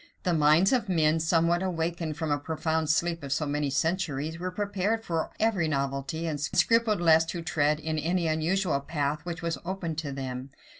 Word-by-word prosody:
The 180 Hz, -, +1 dB
minds 155 Hz, -, +4 dB
of 245 Hz, -5 st, +1 dB
men, 160 Hz, -2 st, +3 dB
somewhat 170 Hz, +2 st, +2 dB
awakened 165 Hz, -3 st, -2 dB
from 160 Hz, -2 st, -2 dB
a 145 Hz, -, +1 dB
profound 160 Hz, +1 st, -1 dB
sleep 165 Hz, +1 st, +1 dB
of 140 Hz, -1 st, -7 dB
so 150 Hz, +2 st, 0 dB
many 145 Hz, 0 st, -1 dB
centuries, 160 Hz, +1 st, -1 dB
were 180 Hz, +1 st, -2 dB
prepared 205 Hz, +3 st, -1 dB
for 165 Hz, -2 st, -1 dB
every 210 Hz, -7 st, +2 dB
novelty, 140 Hz, +2 st, -2 dB
and 150 Hz, -3 st, -3 dB
scrupled 220 Hz, +7 st, +2 dB
less 160 Hz, -2 st, +5 dB
to 170 Hz, 0 st, -5 dB
tread 150 Hz, -2 st, +1 dB
in 155 Hz, 0 st, -2 dB
any 170 Hz, +3 st, 0 dB
unusual 160 Hz, 0 st, +1 dB
path 145 Hz, 0 st, -2 dB
which 175 Hz, 0 st, -5 dB
was 170 Hz, -1 st, -2 dB
opened 170 Hz, -3 st, -3 dB
to 145 Hz, -3 st, -4 dB
them. 130 Hz, -1 st, -5 dB
160 Hz, 185 wpm, -28 LUFS, 150-175 Hz, -, less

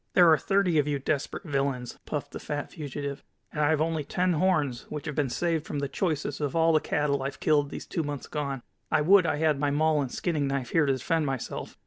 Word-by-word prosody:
"There 175 Hz, -3 st, +7 dB
are -, -, +5 dB
thirty 195 Hz, -5 st, +2 dB
of 145 Hz, -, +1 dB
you 145 Hz, -1 st, 0 dB
desperate 140 Hz, +4 st, -2 dB
villains," 135 Hz, -5 st, -2 dB
puffed -, -, -3 dB
the -, -, -6 dB
fat 145 Hz, -1 st, -4 dB
fugitive, 145 Hz, -2 st, -5 dB, 0.3 s
"and 150 Hz, -, -1 dB
I 145 Hz, -, +3 dB
have 155 Hz, -1 st, +2 dB
only 160 Hz, -1 st, 0 dB
ten 180 Hz, +5 st, 0 dB
horns, 155 Hz, -7 st, +1 dB
which 150 Hz, -2 st, -5 dB
have 150 Hz, -, -3 dB
been 140 Hz, -2 st, 0 dB
saved 165 Hz, +3 st, -1 dB
from 145 Hz, -, -3 dB
the 140 Hz, 0 st, -1 dB
choicest 150 Hz, -3 st, -2 dB
of 145 Hz, 0 st, -2 dB
all 165 Hz, 0 st, +4 dB
the 155 Hz, -, +5 dB
cattle 145 Hz, -2 st, 0 dB
I've 135 Hz, +1 st, -4 dB
killed 145 Hz, -2 st, +2 dB
these -, -, -7 dB
two 165 Hz, -, -2 dB
months 145 Hz, -2 st, -4 dB
gone. 140 Hz, -4 st, -4 dB, 0.3 s
I -, -, +3 dB
would 185 Hz, +3 st, +6 dB
I -, -, +1 dB
had 155 Hz, -2 st, +1 dB
my 145 Hz, 0 st, +1 dB
maul 155 Hz, +1 st, +2 dB
and 130 Hz, -3 st, -3 dB
skinning 155 Hz, -5 st, -1 dB
knife 135 Hz, -2 st, -2 dB
here 160 Hz, -3 st, +3 dB
to 135 Hz, -, +3 dB
defend 155 Hz, +4 st, 0 dB
myself. 135 Hz, -3 st, -4 dB
150 Hz, 240 wpm, -28 LUFS, 140-160 Hz, 0.3 s, There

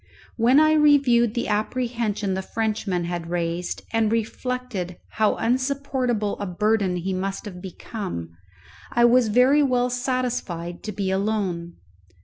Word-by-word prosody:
When 245 Hz, +5 st, +5 dB
I 310 Hz, 0 st, +5 dB
reviewed 275 Hz, -7 st, +4 dB
the 235 Hz, -, -1 dB
apprehension 215 Hz, -2 st, -1 dB
the 190 Hz, -, -2 dB
Frenchman 210 Hz, -4 st, -2 dB
had 170 Hz, -1 st, -4 dB
raised, 170 Hz, 0 st, -2 dB
and 225 Hz, -1 st, +2 dB
reflected 230 Hz, -5 st, -3 dB
how 215 Hz, -1 st, +1 dB
unsupportable 255 Hz, -3 st, -1 dB
a 200 Hz, -, -3 dB
burden 200 Hz, 0 st, +1 dB
he 185 Hz, +2 st, -2 dB
must 195 Hz, +3 st, -3 dB
have 180 Hz, -4 st, -8 dB
become, 185 Hz, -, -6 dB, 0.6 s
I 240 Hz, 0 st, +4 dB
was 240 Hz, 0 st, +5 dB
very 250 Hz, +7 st, +4 dB
well 250 Hz, -3 st, +2 dB
satisfied 245 Hz, -9 st, -2 dB
to 215 Hz, -, -3 dB
be 195 Hz, -1 st, -2 dB
alone. 190 Hz, -4 st, -1 dB
215 Hz, 130 wpm, -24 LUFS, 185-250 Hz, 0.6 s, When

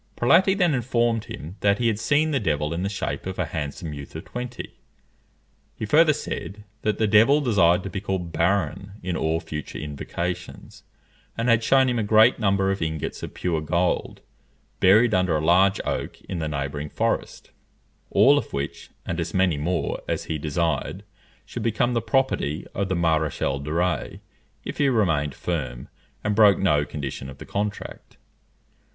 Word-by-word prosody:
Prelati 185 Hz, +10 st, +4 dB
then 175 Hz, -5 st, +3 dB
informed 120 Hz, -3 st, 0 dB
him 85 Hz, +7 st, -8 dB
that 100 Hz, +1 st, +3 dB
he 120 Hz, -, -1 dB
had 110 Hz, -2 st, +1 dB
seen 155 Hz, +5 st, +2 dB
the 140 Hz, -, +1 dB
devil 75 Hz, -5 st, -1 dB
in 85 Hz, -, -3 dB
the 100 Hz, -, -1 dB
shape 100 Hz, -2 st, -4 dB
of 95 Hz, -, -5 dB
a 95 Hz, -, 0 dB
handsome 80 Hz, 0 st, -5 dB
youth 70 Hz, -1 st, -9 dB
of -, -, -7 dB
twenty. 125 Hz, 0 st, -6 dB, 1.0 s
He -, -, -3 dB
further 155 Hz, +7 st, +5 dB
said, 105 Hz, -8 st, -5 dB, 0.2 s
that 110 Hz, -1 st, 0 dB
the 110 Hz, -, +2 dB
devil 110 Hz, +7 st, +5 dB
desired 95 Hz, -, +3 dB
to 100 Hz, -, -5 dB
be 95 Hz, -, -4 dB
called 95 Hz, -4 st, -3 dB
Barron 95 Hz, +2 st, 0 dB
in 90 Hz, -1 st, -2 dB
all 80 Hz, +1 st, 0 dB
future 75 Hz, -3 st, -6 dB
invocations; 85 Hz, +4 st, -5 dB, 0.6 s
and 115 Hz, +2 st, 0 dB
had 115 Hz, -1 st, +4 dB
shewn 135 Hz, +3 st, +4 dB
him 120 Hz, -2 st, 0 dB
a -, -, 0 dB
great 110 Hz, +4 st, +5 dB
number 100 Hz, -2 st, +2 dB
of 95 Hz, -, -3 dB
ingots 80 Hz, -2 st, -3 dB
of -, -, -7 dB
pure 85 Hz, -3 st, -1 dB
gold, 85 Hz, +3 st, -1 dB, 0.6 s
buried 110 Hz, +5 st, +5 dB
under 90 Hz, -3 st, +2 dB
a 75 Hz, -, -2 dB
large 95 Hz, +4 st, +4 dB
oak -, -, -3 dB
in 90 Hz, -, -5 dB
the 80 Hz, -, -2 dB
neighbouring 70 Hz, +1 st, -4 dB
forest, -, -, -2 dB, 0.6 s
all 145 Hz, +2 st, +5 dB
of -, -, -9 dB
which, 70 Hz, +1 st, -4 dB, 0.2 s
and 85 Hz, -, -3 dB
as 85 Hz, -, -3 dB
many 95 Hz, -3 st, +3 dB
more 85 Hz, +3 st, -1 dB
as -, -, -2 dB
he 80 Hz, -, -3 dB
desired, 80 Hz, +5 st, -2 dB, 0.4 s
should -, -, -6 dB
become 120 Hz, +2 st, +1 dB
the 115 Hz, -, +1 dB
property 110 Hz, -, 0 dB
of 100 Hz, 0 st, -2 dB
the 95 Hz, -, 0 dB
Maréchal 80 Hz, -4 st, 0 dB
de 75 Hz, -, -5 dB
Rays 90 Hz, +2 st, -1 dB, 0.5 s
if -, -, -6 dB
he 140 Hz, -2 st, +4 dB
remained 80 Hz, -, +1 dB
firm, 65 Hz, -8 st, -4 dB, 0.3 s
and 105 Hz, -, 0 dB
broke 105 Hz, -2 st, +6 dB
no 75 Hz, -7 st, +2 dB
condition 70 Hz, -3 st, -6 dB
of 65 Hz, -, -11 dB
the -, -, -10 dB
contract. 100 Hz, 0 st, -5 dB
95 Hz, 175 wpm, -24 LUFS, 80-110 Hz, 1.0 s, broke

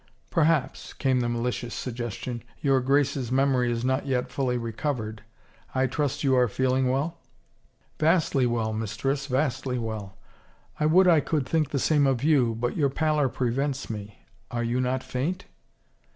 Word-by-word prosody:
" -, -, -39 dB
Perhaps," 160 Hz, -3 st, +1 dB
came 130 Hz, -2 st, +1 dB
the 120 Hz, -1 st, 0 dB
malicious 120 Hz, 0 st, -2 dB
suggestion, 120 Hz, 0 st, -4 dB
" -, -, -31 dB
your 135 Hz, -2 st, +4 dB
Grace's 135 Hz, -2 st, +1 dB
memory 130 Hz, -2 st, +2 dB
is 120 Hz, +1 st, -2 dB
not 130 Hz, +2 st, 0 dB
yet 125 Hz, -1 st, -1 dB
fully 130 Hz, -2 st, 0 dB
recovered. 115 Hz, -2 st, -3 dB, 0.5 s
I 130 Hz, 0 st, +3 dB
trust 145 Hz, +2 st, -1 dB
you 135 Hz, -2 st, +3 dB
are 125 Hz, -1 st, +4 dB
feeling 130 Hz, +3 st, +1 dB
well? 150 Hz, +6 st, -1 dB, 0.3 s
" -, -, -38 dB
" -, -, -39 dB
Vastly 155 Hz, -5 st, +3 dB
well, 115 Hz, -2 st, -1 dB
mistress, 115 Hz, +6 st, -2 dB
vastly 130 Hz, -1 st, 0 dB
well. 110 Hz, -4 st, -5 dB, 0.6 s
I 150 Hz, -, +3 dB
would 180 Hz, +4 st, +5 dB
I 165 Hz, -3 st, +6 dB
could 145 Hz, -2 st, -1 dB
think 160 Hz, -3 st, +1 dB
the 140 Hz, -, -1 dB
same 145 Hz, +1 st, +3 dB
of 130 Hz, -2 st, 0 dB
you, 135 Hz, -7 st, +3 dB
but 120 Hz, +2 st, -2 dB
your 145 Hz, -4 st, +2 dB
pallor 150 Hz, -1 st, +1 dB
prevents 130 Hz, +2 st, -2 dB
me. 105 Hz, -1 st, -8 dB, 0.2 s
Are 120 Hz, 0 st, -2 dB
you 120 Hz, +2 st, 0 dB
not 130 Hz, +1 st, -1 dB
faint? 145 Hz, +9 st, -3 dB
130 Hz, 170 wpm, -26 LUFS, 120-140 Hz, 0.6 s, I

